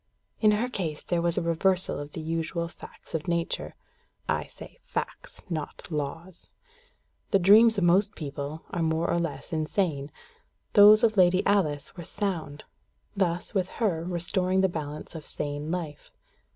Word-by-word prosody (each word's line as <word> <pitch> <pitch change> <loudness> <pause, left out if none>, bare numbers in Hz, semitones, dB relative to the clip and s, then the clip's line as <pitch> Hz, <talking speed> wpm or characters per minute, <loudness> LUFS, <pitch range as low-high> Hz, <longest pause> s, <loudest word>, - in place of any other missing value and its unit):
In 215 - +5
her 220 +4 +1
case 170 -11 -4
there 175 -1 0
was 170 0 0
a - - +1
reversal 180 +1 +1
of 145 0 -8
the 160 - -5
usual 165 +1 -2
facts - - -14
of 160 +2 -3
nature 170 -1 -2 0.5
(I - - 0
say - - -13
facts, - - -5
not 165 0 -5
laws): 160 +4 -5 0.8
the - - +4
dreams 215 +4 +6
of 195 - +1
most 195 +5 +3
people 145 +1 -6
are 175 - -2
more 160 +1 +1
or 170 - +1
less 170 -1 -4
insane; 155 -2 -1 0.6
those 210 +1 +8
of 220 -2 +3
Lady 185 0 +4
Alice 160 -8 +1
were 175 - -7
sound; 165 -6 -3 0.5
thus, 175 -3 -1
with 190 -3 0
her, 185 -8 0
restoring 180 +2 0
the 190 - +4
balance 150 -3 -6
of 160 -2 -7
sane 145 +1 -4
life. 165 -4 -4
170 Hz, 155 wpm, -27 LUFS, 155-190 Hz, 0.8 s, those